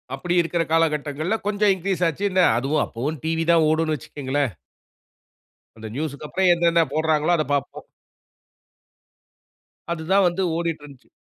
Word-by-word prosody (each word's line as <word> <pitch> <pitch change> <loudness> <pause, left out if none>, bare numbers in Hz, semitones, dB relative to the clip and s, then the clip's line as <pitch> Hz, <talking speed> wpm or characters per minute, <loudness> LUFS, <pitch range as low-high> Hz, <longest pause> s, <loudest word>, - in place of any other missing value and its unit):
அப்படி 175 +6 -3
இருக்கிற 170 0 -1
காலகட்டங்கள்ல, 155 +3 0
கொஞ்சம் 205 -1 +3
இன்கிரீஸ் 185 0 -2
ஆச்சு. 165 +4 -4
என்ன, 185 - +3 0.2
அதுவும் 145 +4 0
அப்பவும் 140 +7 -4
டிவி 165 0 0
தான் 165 -2 +4
ஓடுன்னு 155 0 +1
வச்சுக்கங்களேன். 140 -1 -3 1.3
அந்த 110 0 -8
நியூஸுக்கு 150 0 -4
அப்புறம் 185 +1 +2
என்னென்ன 170 -1 +3
போடுறாங்களோ, 155 +1 +1
அத 155 - +1
பாப்போம். 140 - -3 2.0
அது 160 -2 -3
தான் 195 0 +5
வந்து 180 +2 -1
ஓடிட்ருந்துச்சு. 150 -5 -5
160 Hz, 130 wpm, -23 LUFS, 145-175 Hz, 2.0 s, தான்